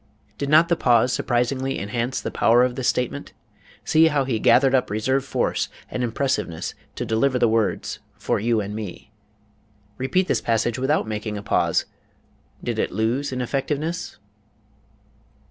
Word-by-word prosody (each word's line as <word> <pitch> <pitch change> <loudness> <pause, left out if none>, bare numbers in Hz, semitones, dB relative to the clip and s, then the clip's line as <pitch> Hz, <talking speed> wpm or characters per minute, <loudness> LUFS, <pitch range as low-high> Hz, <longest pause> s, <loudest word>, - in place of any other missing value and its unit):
Did 140 - -2
not 155 +3 +6
the 170 - +2
pause 125 -3 +3
surprisingly 130 +2 0
enhance 115 +5 -2
the - - -4
power 120 +2 +4
of 125 -1 +1
this 130 -1 -2
statement? 125 -1 -2 0.5
See 160 +1 +5
how 145 -3 +1
he 120 -4 -1
gathered 130 +4 +4
up 130 -1 +2
reserve 130 +6 0
force 135 - -1 0.2
and 125 - -2
impressiveness 115 -8 -2 0.2
to 125 - -3
deliver 120 +4 +1
the 120 -1 +3
words 110 -2 0 0.2
"for - - -1
you 115 +1 +1
and 105 +1 -5
me." 105 -1 -7 0.9
Repeat 180 +9 +1
this - - +1
passage 115 +1 0
without 135 -1 +1
making 105 0 -4
a 100 - -7
pause. - - +1 0.8
Did - - -2
it - - 0
lose 115 +8 -1
in 130 -1 -3
effectiveness? 145 +7 -3
125 Hz, 155 wpm, -23 LUFS, 110-135 Hz, 0.9 s, not